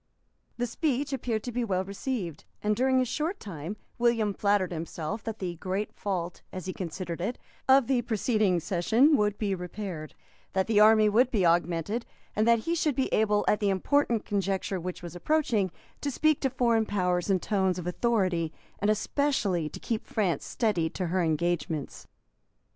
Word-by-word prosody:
The 245 Hz, -, 0 dB
speech 280 Hz, +2 st, -1 dB
appeared 230 Hz, -4 st, -2 dB
to 245 Hz, -, -4 dB
be 245 Hz, +1 st, -1 dB
well 190 Hz, -4 st, 0 dB
received; 195 Hz, -, -4 dB, 0.2 s
and 210 Hz, 0 st, +2 dB
during 260 Hz, +2 st, +3 dB
a -, -, +1 dB
short 310 Hz, -, -2 dB
time 180 Hz, +1 st, -6 dB, 0.2 s
William 230 Hz, -3 st, +2 dB
flattered 200 Hz, -2 st, +1 dB
himself 170 Hz, +5 st, -4 dB
that 225 Hz, -1 st, -4 dB
the 175 Hz, -4 st, -4 dB
great 190 Hz, +4 st, -3 dB
fault, 180 Hz, -4 st, -3 dB
as 185 Hz, -1 st, -6 dB
he 185 Hz, -, -3 dB
considered 175 Hz, -1 st, -5 dB
it, 230 Hz, +7 st, -2 dB, 0.3 s
of 265 Hz, -1 st, +7 dB
the 255 Hz, 0 st, +2 dB
preceding 215 Hz, -5 st, +1 dB
session 225 Hz, -, +3 dB
would 210 Hz, -4 st, +1 dB
be 205 Hz, -3 st, 0 dB
repaired, 180 Hz, -3 st, -6 dB, 0.4 s
that 190 Hz, 0 st, +2 dB
the 220 Hz, -2 st, +3 dB
army 215 Hz, 0 st, +7 dB
would 235 Hz, +5 st, +4 dB
be 210 Hz, -8 st, +1 dB
augmented, 170 Hz, +6 st, +1 dB, 0.3 s
and 215 Hz, +2 st, +2 dB
that 235 Hz, 0 st, +6 dB
he 335 Hz, -, +1 dB
should 310 Hz, -4 st, +1 dB
be 265 Hz, -, 0 dB
able, 210 Hz, -1 st, +3 dB
at 210 Hz, -, +3 dB
the 205 Hz, -2 st, +1 dB
important 235 Hz, +4 st, +1 dB
conjuncture 195 Hz, -1 st, -1 dB
which 180 Hz, +1 st, -6 dB
was 175 Hz, 0 st, -7 dB
approaching, 230 Hz, -, +1 dB, 0.3 s
to 290 Hz, -, -1 dB
speak 310 Hz, +2 st, +2 dB
to 270 Hz, -, +2 dB
foreign 235 Hz, -3 st, +2 dB
powers 180 Hz, -2 st, 0 dB
in 190 Hz, -1 st, +3 dB
tones 190 Hz, -2 st, +1 dB
of 180 Hz, -, -5 dB
authority, 180 Hz, -4 st, +1 dB, 0.3 s
and 205 Hz, -, +1 dB
especially 215 Hz, -, +1 dB
to -, -, -9 dB
keep 225 Hz, -2 st, -3 dB
France 195 Hz, -6 st, 0 dB
steady 205 Hz, -9 st, 0 dB
to 185 Hz, -, -3 dB
her 185 Hz, -, +2 dB
engagements. 160 Hz, -2 st, -1 dB
205 Hz, 175 wpm, -28 LUFS, 180-235 Hz, 0.4 s, of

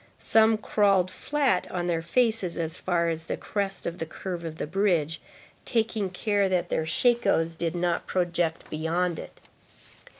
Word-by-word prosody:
Some 220 Hz, 0 st, +4 dB
crawled 200 Hz, -4 st, +2 dB
flat 275 Hz, -6 st, 0 dB
on 175 Hz, -1 st, -2 dB
their 170 Hz, -2 st, 0 dB
faces 220 Hz, 0 st, +1 dB
as 165 Hz, -1 st, -1 dB
far 170 Hz, -2 st, 0 dB
as 165 Hz, 0 st, -3 dB
the -, -, -3 dB
crest 200 Hz, -2 st, -3 dB
of 170 Hz, +1 st, -4 dB
the 160 Hz, -, -2 dB
curve 175 Hz, +1 st, -5 dB
of 160 Hz, -1 st, -6 dB
the -, -, -3 dB
bridge, 170 Hz, -3 st, 0 dB, 0.4 s
taking 220 Hz, -4 st, 0 dB
care 200 Hz, +1 st, +1 dB
that 180 Hz, -2 st, 0 dB
their 160 Hz, -, -1 dB
shakos 165 Hz, -4 st, +2 dB
did 165 Hz, +1 st, -2 dB
not 175 Hz, -1 st, -1 dB
project 175 Hz, -2 st, -1 dB
beyond 165 Hz, +2 st, -1 dB
it. -, -, -10 dB
180 Hz, 160 wpm, -27 LUFS, 165-205 Hz, 0.4 s, Some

